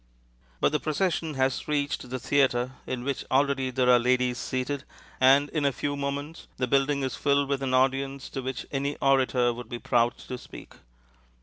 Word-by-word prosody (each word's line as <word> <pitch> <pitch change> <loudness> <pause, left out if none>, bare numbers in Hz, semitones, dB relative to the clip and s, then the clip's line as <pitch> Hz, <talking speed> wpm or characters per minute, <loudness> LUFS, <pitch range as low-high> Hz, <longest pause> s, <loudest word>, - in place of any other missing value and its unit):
But - - +3
the 150 - +1
procession 160 0 -1
has 130 -1 0
reached 145 -4 -1
the 130 - -3
theatre, 130 -1 +1 0.2
in 125 -1 -3
which 140 0 -2
already 135 -1 +2
there 130 0 +1
are 125 -1 +7
ladies 125 0 +1
seated, 130 +2 -3 0.4
and 135 +2 +5
in 155 - -2
a 140 - +3
few 145 +2 -3
moments 140 +3 -4
the 125 - 0
building 140 +2 +1
is 130 - -2
filled 140 0 +2
with 140 -1 -1
an 130 -1 0
audience 135 +1 +1
to 135 - -4
which 130 0 -4
any 140 +1 -1
orator 130 -3 +2
would 120 -1 -9
be 120 - -4
proud 120 0 +1
to 125 - -7
speak. - - -12
135 Hz, 185 wpm, -27 LUFS, 125-140 Hz, 0.4 s, are